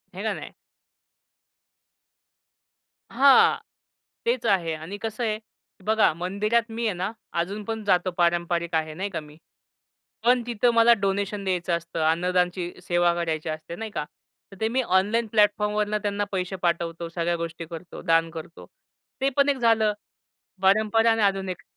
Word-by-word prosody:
हे - - -5
का - - 0
नाही? - - -8 2.6
हां, 275 0 +6 0.7
तेच 475 +1 0
आहे 175 -5 +2
आणि 160 +6 -6
कसं 225 +2 -3
आहे 215 -1 -1 0.5
बघा 220 -3 +4
मंदिरात 205 +7 0
मी 230 +1 -3
आहे 215 - +1
ना, 185 +4 -2 0.2
अजून 195 +5 -2
पण 225 0 -4
जातो 185 -2 +2
पारंपरिक 170 -1 +1
आहे 155 -1 -1
नाही 190 +5 -3
का 180 - -4
मी. 150 0 -14 0.9
पण 245 +1 +4
तिथं 240 0 +2
मला 230 +1 +6
डोनेशन 200 +1 -1
द्यायचं 180 -2 -1
असतं, 170 0 -7
अन्नदानची 180 +1 0 0.2
सेवा 175 0 +3
करायची 165 -2 -2
असते 155 +2 -6
नाही 220 +3 -6
का? 150 - -3 0.5
तर 195 - -12
ते 220 - +2
मी 250 +4 +1
ऑनलाईन 215 +2 +1
प्लॅटफॉर्मवरनं 210 0 +2
त्यांना 205 0 -1
पैसे 185 0 -2
पाठवतो, 170 0 -1
सगळ्या 170 0 -1
गोष्टी 165 0 -5
करतो, 170 +1 -9
दान 165 -1 +2
करतो. 165 0 -9 0.6
ते 270 - +3
पण 280 0 +4
एक 280 - +1
झालं 225 -3 +3 0.7
परंपरा 215 +3 +4
आणि 225 -1 +2
आधुनिक. 195 -2 0
190 Hz, 150 wpm, -25 LUFS, 170-220 Hz, 2.6 s, हां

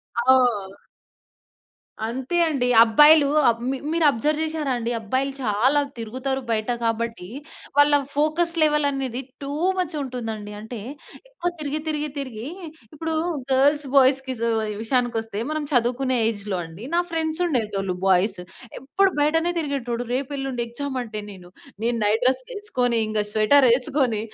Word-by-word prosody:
ఆ! 235 -6 +2 1.2
అంతే 260 +8 -3
అండి. 255 -5 0
అబ్బాయిలు 295 +6 +6 0.4
మి 270 - -2
మీరు 335 -1 +1
అబ్జర్వ్ 300 +6 -1
చేసారా 310 -4 -2
అండి? 235 0 -3
అబ్బాయిలు 260 +6 -1
చాలా 245 +7 +2 0.2
తిరుగుతారు 260 +4 -3
బయట 220 +1 0
కాబట్టి. 230 -4 -2 0.5
వాళ్ళ 290 0 +6 0.2
ఫోకస్ 310 +4 +1
లెవెల్ 300 -1 +3
అనేది 265 -3 -3 0.2
టూ 275 - -5 0.3
మచ్ 355 -3 -2
ఉంటుందండి. 225 -5 -5
అంటే, 220 +1 -7 0.5
ఎక్కువ 350 -8 -3
తిరిగి, 295 +1 -2
తిరిగి, 300 -1 -2
తిరిగి 245 -4 -6 0.5
ఇప్పుడు 320 +1 -3 0.4
గర్ల్స్, 285 +3 +3
బాయ్స్‌కి 265 0 +4 0.5
విషయానికొస్తే 225 -3 -1
మనం 310 -1 -2
చదువుకునే 250 +1 +1
ఏజ్‌లో 205 -3 -3
అండి 165 +7 -11
నా 345 - +4
ఫ్రెండ్స్ 320 0 -2
ఉండేటోళ్ళు 210 - -1
బాయ్స్. 190 +1 +2 0.4
ఎప్పుడు 380 +8 +2
బయటనే 325 +4 +2
తిరిగేటోడు. 250 -6 -2
రేపు 270 +2 -2
ఎల్లుండి 265 -3 -3
ఎగ్జామ్ 265 +2 -4
అంటే, 215 -3 -6
నేను 180 -2 -12 0.4
నేను 235 0 +1
నైట్ 220 +4 +2
డ్రెస్‌లేసుకొని, 265 - 0
ఇంగా 215 -1 0
స్వెటర్ 250 +5 +5
ఏసుకొని 250 -3 0
260 Hz, 130 wpm, -23 LUFS, 225-295 Hz, 1.2 s, అబ్బాయిలు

